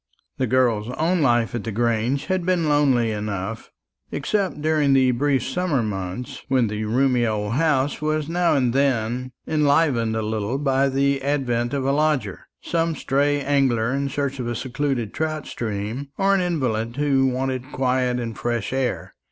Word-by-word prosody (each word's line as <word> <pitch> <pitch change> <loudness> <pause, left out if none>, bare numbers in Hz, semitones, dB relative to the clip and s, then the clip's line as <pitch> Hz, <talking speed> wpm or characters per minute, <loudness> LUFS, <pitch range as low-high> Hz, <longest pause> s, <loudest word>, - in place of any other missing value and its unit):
The 130 - +1
girl's 120 -3 +2
own 170 +2 +1
life 120 -5 +2
at 120 -4 -3
the 115 - -4
Grange 115 +4 0
had 185 -1 -1
been 175 -2 +1
lonely 135 -6 +3
enough, 105 0 -4 0.4
except 190 0 -1
during 155 -3 +3
the 130 -1 +4
brief 135 +1 +1
summer 145 -3 0
months, 95 +2 -5
when 130 -4 +2
the 105 +1 -3
roomy 125 +2 +2
old 105 0 -1
house 145 -1 +1
was 155 -1 0
now 170 -1 +2
and 125 -4 +1
then 125 -2 0 0.2
enlivened 145 -7 +2
a 110 - -1
little 110 +3 -2
by 135 -1 +2
the 140 0 +1
advent 130 -3 0
of 135 -1 -1
a 135 - +2
lodger, 150 -1 0 0.2
some 165 -1 0
stray 145 +1 +1
angler 130 -4 +1
in 140 0 -1
search 140 0 -2
of 120 - -3
a 120 - -2
secluded 130 -3 -2
trout 155 -1 -2
stream, 110 +4 -4
or 195 0 +3
an 195 - +2
invalid 120 -10 -1
who 140 -2 +2
wanted 130 +1 -2
quiet 125 -1 0
and 115 -3 -5
fresh 120 -1 -2
air. 130 -2 -2
130 Hz, 170 wpm, -23 LUFS, 120-145 Hz, 0.4 s, the